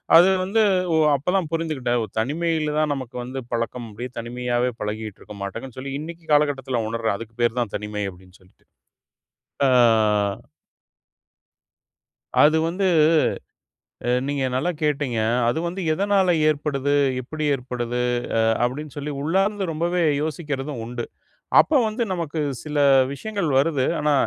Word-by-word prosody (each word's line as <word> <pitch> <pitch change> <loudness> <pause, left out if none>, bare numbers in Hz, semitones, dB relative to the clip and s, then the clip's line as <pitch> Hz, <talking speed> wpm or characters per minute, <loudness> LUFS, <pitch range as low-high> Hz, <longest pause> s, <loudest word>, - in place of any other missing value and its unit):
அது 175 +3 +8 0.2
வந்து 215 +4 +1 0.3
ஓ! - - +3 0.2
அப்ப 145 +6 -1
தான் 180 -5 +1
புரிந்துகிட்டேன். 150 -7 -1
ஓ! - - -1
தனிமையில 155 +3 -1
தான் 155 -1 +1
நமக்கு 130 -4 -7
வந்து 130 +2 -5
பழக்கம். 115 0 -3
அப்டியே 120 +5 -6
தனிமையாவே 120 +1 -1
பழகிட்டு 105 0 -5
இருக்கோமாட்டுனு 100 +5 -7
சொல்லி, 135 +1 -5
இன்னைக்கி 165 +1 -8
காலகட்டத்துல 135 -5 +1
உணர்றேன். 115 -3 -1
அதுக்கு 115 0 -10
பெயர் 120 +1 +1
தான் 115 -4 -2
தனிமை, 105 0 -4
அப்டினு 90 +1 -18
சொல்லிட்டு. 90 - -26 1.0
அ - - +4 2.7
அது 155 +2 +5
வந்து 190 +3 -1 1.2
அ - - +3 0.2
நீங்க 140 -2 -1
நல்லா 150 +8 0
கேட்டீங்க. 145 -6 0 0.3
அது 120 - 0
வந்து 180 +3 -4
எதனால 195 +1 +2 0.2
ஏற்படுது? 145 -2 0 0.3
எப்டி 155 +5 -5
ஏற்படுது? 125 -2 -3 0.4
அ - - +4 0.2
அப்டினு 145 +4 -3
சொல்லி, 145 +1 -4
உள்ளார்ந்து 195 +6 +1
ரொம்பவே 170 +2 0 0.2
யோசிக்கிறதும் 150 -4 -4
உண்டு. 120 0 -5 0.6
அப்ப 315 - +4
வந்து, 220 +3 -1
நமக்கு 165 -3 -3 0.2
சில 150 -1 -4 0.4
விஷயங்கள் 200 -1 -3
வருது. 140 -2 +2
ஆனா, 150 -1 +2
140 Hz, 130 wpm, -23 LUFS, 120-160 Hz, 2.7 s, அது